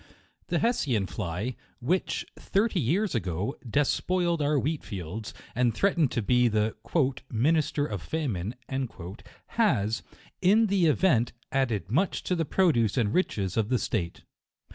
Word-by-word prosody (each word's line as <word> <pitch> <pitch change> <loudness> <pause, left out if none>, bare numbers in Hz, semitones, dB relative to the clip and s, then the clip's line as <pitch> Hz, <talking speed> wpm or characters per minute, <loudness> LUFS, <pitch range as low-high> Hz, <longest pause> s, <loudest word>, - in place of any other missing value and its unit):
The - - +1
Hessian 140 - +1
fly, 95 +7 -3 0.2
which, 175 +10 0
thirty 200 -1 0
years 175 - +1
ago, 95 - -2
despoiled 170 - +1
our 145 +1 +2
wheat 150 +3 -1
fields, 100 +3 -6 0.2
and 120 -1 +1
threatened 170 - +3
to 115 - 0
be 125 +3 +4
the 110 -1 +1 0.2
u 140 -5 +4 0.2
minister 145 +4 +2
of 100 - -4
famine" 115 - -2 0.9
has, 115 - +1 0.4
in 205 +5 +5
the 195 -5 +3
event, 140 -7 +3 0.2
added 120 -7 0
much 180 +10 +1
to 180 - 0
the 165 -2 0
produce 140 - +2
and 110 -3 +2
riches 100 - 0
of 110 -1 +1
the 130 - +3
state. 90 -8 -2
130 Hz, 140 wpm, -28 LUFS, 105-170 Hz, 0.9 s, in